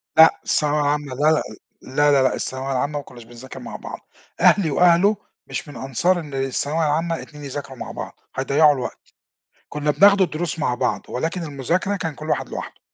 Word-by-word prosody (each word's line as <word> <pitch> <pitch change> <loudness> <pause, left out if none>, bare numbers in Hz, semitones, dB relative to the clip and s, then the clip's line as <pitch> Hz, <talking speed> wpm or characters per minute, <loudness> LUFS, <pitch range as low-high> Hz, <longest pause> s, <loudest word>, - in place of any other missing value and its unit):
لأ، 160 0 +7
الثانوية 150 0 +1
العامة، 145 -2 -1
لا 150 +4 +3
لا 155 - +2 0.4
لا 145 +3 +2
لا 140 -2 +4
لأ، 130 - +2
الثانوية 130 +1 -4
العامة 145 +3 -1
ما - - -8
كناش 120 -2 -13
بنذاكر 120 +3 -11
مع - - -8
بعض، - - -7 0.4
أهلي 175 -7 +5
وأهله 180 +6 +4 0.3
مش - - -5
من 145 - -10
أنصار 135 +8 0
إن 150 -4 -9
الثانوية 140 +4 -1
العامة 165 +3 0
اتنين 150 -2 -12
يذاكروا 135 -1 -6
مع - - -6
بعض، - - -8 0.2
هيضيعوا 145 +3 +4
الوقت، 130 -3 -5 0.7
كنا 150 0 0
بناخد 200 +4 +6
الدروس 165 -1 -1
مع 125 -5 +1
بعض، 125 -1 -1
ولكن 165 +7 -2
المذاكرة 165 +7 -1
كان 160 -6 -4
كُلّ 155 +1 -8
واحد - - -1
لوحده. - - -7
150 Hz, 185 wpm, -22 LUFS, 135-165 Hz, 0.7 s, لأ